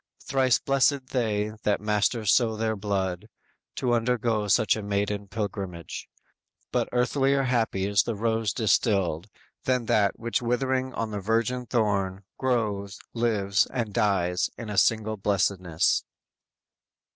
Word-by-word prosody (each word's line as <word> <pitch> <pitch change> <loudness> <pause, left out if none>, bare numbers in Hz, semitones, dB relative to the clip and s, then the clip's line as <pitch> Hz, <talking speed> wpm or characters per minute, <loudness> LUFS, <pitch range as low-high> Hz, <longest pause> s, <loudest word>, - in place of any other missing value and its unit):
Thrice 130 -2 +2
blessed 135 -1 +1
they 110 -4 0
that 105 -2 +1
master 105 +2 0
so 110 +2 +3
their 110 0 -1
blood, 95 -3 -2 0.5
To 125 -2 0
undergo 115 -2 +1
such 110 +2 +3
maiden 100 -1 -2
pilgrimage; 95 -5 -5 0.6
But - - 0
earthlier 135 +2 +2
happy 115 -6 0
is 100 -1 +3
the 115 - -3
rose 110 0 0
distilled, 100 -6 +1 0.4
Than 125 -2 +1
that, 100 -2 +2
which 115 +1 -1
withering 130 +2 0
on 115 -1 -2
the 105 - -3
virgin 115 +5 0
thorn 100 -5 0 0.2
Grows, 105 -6 -1 0.2
lives, 105 -4 +1
and 115 -5 -3
dies 90 -5 +1
in 110 -2 -5
single 110 +1 +2
blessedness!" 95 -4 +1
110 Hz, 120 wpm, -26 LUFS, 100-120 Hz, 0.6 s, so